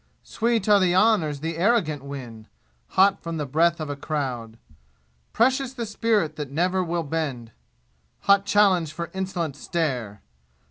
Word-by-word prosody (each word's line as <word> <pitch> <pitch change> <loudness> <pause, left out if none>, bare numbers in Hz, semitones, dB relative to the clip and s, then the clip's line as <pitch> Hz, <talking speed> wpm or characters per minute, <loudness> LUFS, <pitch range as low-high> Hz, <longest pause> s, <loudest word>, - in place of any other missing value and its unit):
Sweet 230 -2 -1
are 205 -1 +6
the 180 -2 +2
honors 180 -9 +2
the 165 +1 -4
arrogant 175 - +1
win, 125 -6 -8 0.5
Hot 195 +1 +5
from 165 -1 -5
the 150 - -2
breath 165 +5 +2
of 155 - -4
a 145 - -4
crowd. 130 -7 -4 0.7
Precious 260 +2 +1
the 240 -3 -4
spirit 210 -7 0
that 150 -3 -5
never 180 +6 0
will 170 -1 -2
bend 140 -7 -4 0.7
Hot 200 0 +4
challenge 195 -6 +3
for 170 +1 -6
insolent 185 -6 -3
stare! 125 - -3
165 Hz, 145 wpm, -24 LUFS, 145-200 Hz, 0.7 s, are